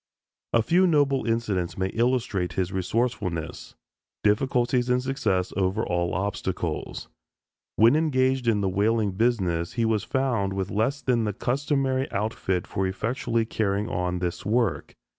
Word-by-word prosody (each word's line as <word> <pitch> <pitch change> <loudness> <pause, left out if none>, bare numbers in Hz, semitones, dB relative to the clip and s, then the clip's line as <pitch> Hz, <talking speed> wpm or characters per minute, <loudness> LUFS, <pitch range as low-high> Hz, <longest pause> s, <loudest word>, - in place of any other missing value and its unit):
A 115 - +3
few 180 +9 +4
noble 145 -6 +2
incidents 110 -6 -1
may 95 0 0
illustrate 115 -7 0
his 95 +1 -1
resourcefulness, 95 -3 -2 0.5
difficulties 120 +3 +2
and 125 0 +3
success 110 -8 -1
over 95 +3 0
all 85 -1 -1
obstacles. 100 +3 -3 0.7
When 115 +5 +6
engaged 130 -5 +1
in 105 -3 +3
the 100 - +1
whaling 105 +2 +1
business 95 -6 0
he 115 -1 0
was 110 -2 +1
found 120 -5 0
with 95 -1 -3
less 115 +8 0
than 120 -3 +1
the 105 - -1
customary 135 +2 0
outfit 100 -3 -1
for 95 0 -1
effectually 115 +3 -1
carrying 105 -2 -1
on 90 0 -1
this 90 -1 -3
work. 115 -2 0
110 Hz, 140 wpm, -26 LUFS, 95-125 Hz, 0.7 s, When